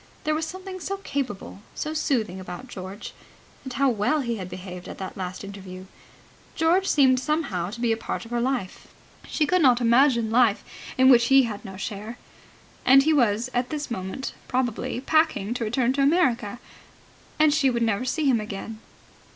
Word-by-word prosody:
There 310 Hz, -, +1 dB
was 315 Hz, +1 st, -1 dB
something 375 Hz, +1 st, -7 dB
so 395 Hz, +3 st, -4 dB
capable, 265 Hz, -, -5 dB, 0.2 s
so 310 Hz, -, -3 dB
soothing 230 Hz, -, -1 dB
about 185 Hz, +6 st, -8 dB
George. 190 Hz, -2 st, -8 dB, 0.5 s
And 260 Hz, -, -7 dB
how 275 Hz, +2 st, +2 dB
well 230 Hz, +8 st, +1 dB
he 235 Hz, -3 st, -2 dB
had 185 Hz, -2 st, -6 dB
behaved 180 Hz, 0 st, -8 dB
at -, -, -8 dB
that 190 Hz, -, -6 dB
last 185 Hz, 0 st, -5 dB
interview. 190 Hz, -2 st, -9 dB, 0.7 s
George 350 Hz, +4 st, +2 dB
seemed 260 Hz, -3 st, +4 dB
somehow 260 Hz, -, -1 dB
to 225 Hz, +4 st, -8 dB
be 235 Hz, -2 st, +1 dB
part 225 Hz, -, -5 dB
of 230 Hz, -, -13 dB
her 240 Hz, 0 st, 0 dB
life. 245 Hz, -7 st, -3 dB, 0.4 s
She 310 Hz, -, +1 dB
could 365 Hz, +4 st, +2 dB
not 250 Hz, -4 st, +5 dB
imagine 235 Hz, -1 st, +4 dB
a -, -, -6 dB
life 230 Hz, -3 st, +3 dB, 0.3 s
in 260 Hz, 0 st, +6 dB
which 235 Hz, -2 st, +6 dB
he 270 Hz, 0 st, +6 dB
had 215 Hz, -4 st, -5 dB
no 190 Hz, -3 st, -9 dB
share. 210 Hz, +4 st, -6 dB, 0.7 s
And 270 Hz, +2 st, +7 dB
he 315 Hz, +2 st, +3 dB
was 240 Hz, -2 st, +2 dB
at 245 Hz, 0 st, 0 dB
this 295 Hz, -4 st, -4 dB
moment, 190 Hz, +5 st, -4 dB
probably, 250 Hz, -1 st, -2 dB
packing 310 Hz, -8 st, +1 dB
to 245 Hz, -, -3 dB
return 240 Hz, +3 st, +1 dB
to 280 Hz, -, 0 dB
America, 260 Hz, -, +2 dB, 0.8 s
and 305 Hz, -1 st, +4 dB
she 290 Hz, -3 st, +3 dB
would 235 Hz, -2 st, 0 dB
never 225 Hz, +1 st, 0 dB
see 300 Hz, +4 st, -1 dB
him 250 Hz, -5 st, +3 dB
again. 215 Hz, +1 st, -7 dB
245 Hz, 185 wpm, -25 LUFS, 205-280 Hz, 0.8 s, And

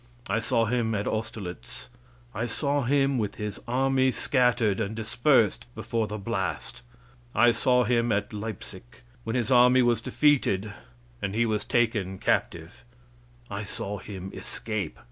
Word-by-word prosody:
I 105 Hz, +2 st, 0 dB
saw 115 Hz, 0 st, +1 dB
him 115 Hz, -1 st, 0 dB
at 100 Hz, -, -1 dB
Austerlitz. 110 Hz, -2 st, -5 dB, 0.4 s
I 115 Hz, +3 st, -2 dB
saw 140 Hz, +4 st, 0 dB
him 135 Hz, 0 st, +2 dB
with 105 Hz, -2 st, -2 dB
his 105 Hz, -1 st, -5 dB
army 130 Hz, +1 st, +2 dB
scattered 125 Hz, -6 st, +2 dB
and 110 Hz, 0 st, -2 dB
dispersed 115 Hz, +1 st, +2 dB
before 115 Hz, -2 st, -2 dB
the 105 Hz, -, -5 dB
blast. 100 Hz, -2 st, -3 dB, 0.5 s
I 120 Hz, +1 st, +6 dB
saw 125 Hz, +2 st, +3 dB
him 120 Hz, 0 st, +1 dB
at 105 Hz, +1 st, -1 dB
Leipsic 105 Hz, -, -8 dB, 0.2 s
when 115 Hz, +2 st, -3 dB
his 120 Hz, 0 st, 0 dB
army 125 Hz, 0 st, +6 dB
was 120 Hz, -1 st, +2 dB
defeated 110 Hz, -9 st, +2 dB, 0.5 s
and 100 Hz, +1 st, -2 dB
he 120 Hz, +1 st, +3 dB
was 110 Hz, -2 st, 0 dB
taken 105 Hz, -6 st, 0 dB
captive. 85 Hz, 0 st, -1 dB, 0.6 s
I 100 Hz, -1 st, -4 dB
saw 100 Hz, 0 st, -5 dB
him 95 Hz, 0 st, -8 dB
escape. 105 Hz, -8 st, -4 dB
115 Hz, 145 wpm, -27 LUFS, 105-125 Hz, 0.6 s, I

